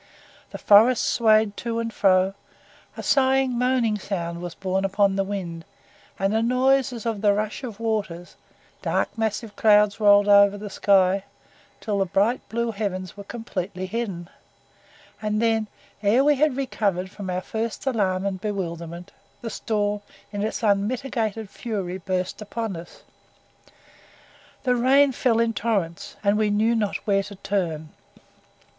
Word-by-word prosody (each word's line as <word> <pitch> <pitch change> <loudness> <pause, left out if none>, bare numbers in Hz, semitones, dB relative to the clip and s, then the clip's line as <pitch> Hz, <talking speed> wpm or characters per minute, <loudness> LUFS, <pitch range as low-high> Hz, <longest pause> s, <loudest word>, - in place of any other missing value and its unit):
The - - -7
forest 220 +4 +5
swayed 215 -2 +3
to 230 -1 -3
and 230 -1 -3
fro, 190 -1 +3 0.6
a - - -6
sighing 265 -2 +2
moaning 240 -3 +1
sound 170 -4 -4
was 175 -1 -6
borne 190 0 -1
upon 195 0 +2
the 195 - +1
wind, 180 -4 -5 0.5
and 195 +1 0
a 220 - +2
noise 260 +3 +2
as 235 -3 -7
of 225 -3 -2
the 205 -2 +4
rush 215 +5 -3
of 225 -4 -7
waters, 205 -6 -3 0.5
dark - - -1
massive 220 -1 -3
clouds 210 -5 +4
rolled 205 -1 +5
over 200 0 +6
the 205 0 -7
sky 195 0 +3 0.5
till 205 -2 -2
the 195 - +2
bright 205 +8 +1
blue 235 0 -1
heavens 190 -4 -4
were 200 - -9
completely 195 -4 -5
hidden, 190 -4 -4 0.9
and 215 0 -1
then, 225 -1 +1 0.3
ere 220 +6 +4
we 295 +1 +5
had 290 -1 +1
recovered 200 -8 -1
from 200 -3 -7
our 180 0 -1
first 225 +5 -4
alarm 195 -7 0
and 190 -2 -3
bewilderment, 170 -4 -5 0.3
the 230 -2 -5
storm 210 -2 -1 0.3
in 205 - -3
its 220 +2 -3
unmitigated 220 +1 0
fury 195 -4 -5
burst 185 +2 -3
upon 215 -1 -4
us. 170 +1 -11 1.6
The 250 -2 +2
rain 270 +3 +4
fell 240 -2 +1
in 230 0 +1
torrents, 195 -6 -2
and 205 +1 +2
we 215 -1 +2
knew 215 +3 +2
not 215 -3 0
where 195 -1 +2
to 200 +1 -9
turn. 170 -6 -2
210 Hz, 150 wpm, -24 LUFS, 195-230 Hz, 1.6 s, over